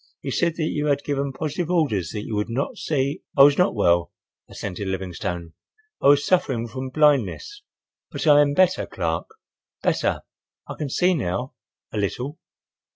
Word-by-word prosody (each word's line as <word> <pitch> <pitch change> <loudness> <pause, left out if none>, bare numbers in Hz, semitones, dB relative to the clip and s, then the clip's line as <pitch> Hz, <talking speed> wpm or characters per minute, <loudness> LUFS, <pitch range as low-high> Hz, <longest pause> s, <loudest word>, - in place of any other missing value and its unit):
He - - -5
said 170 -2 +1
that 165 - -2
you 150 -1 -1
had 140 -1 +1
given 140 -1 -1
positive 155 +4 -3
orders 120 - +1
that 105 - -5
you 110 - -6
would 105 +2 -1
not 125 +4 -2
see—" 140 -2 -1 0.2
"I 135 - +9
was 145 +2 +6
not 180 - +3
well," 85 -4 +2 0.4
assented 100 0 -5
Livingstone. 90 -3 -4 0.5
"I - - +3
was 145 0 +5
suffering 130 -10 +1
from 130 +2 -5
blindness. 150 - +1 0.5
But - - -5
I 145 -1 +7
am 145 -1 +2
better, 185 +1 +3
Clark, 80 -3 -3 0.5
better. - - +1 0.5
I - - -5
can 150 -3 -4
see 180 +7 +2
now—a 125 - -5
little." 125 +9 -3
140 Hz, 160 wpm, -23 LUFS, 105-150 Hz, 0.5 s, I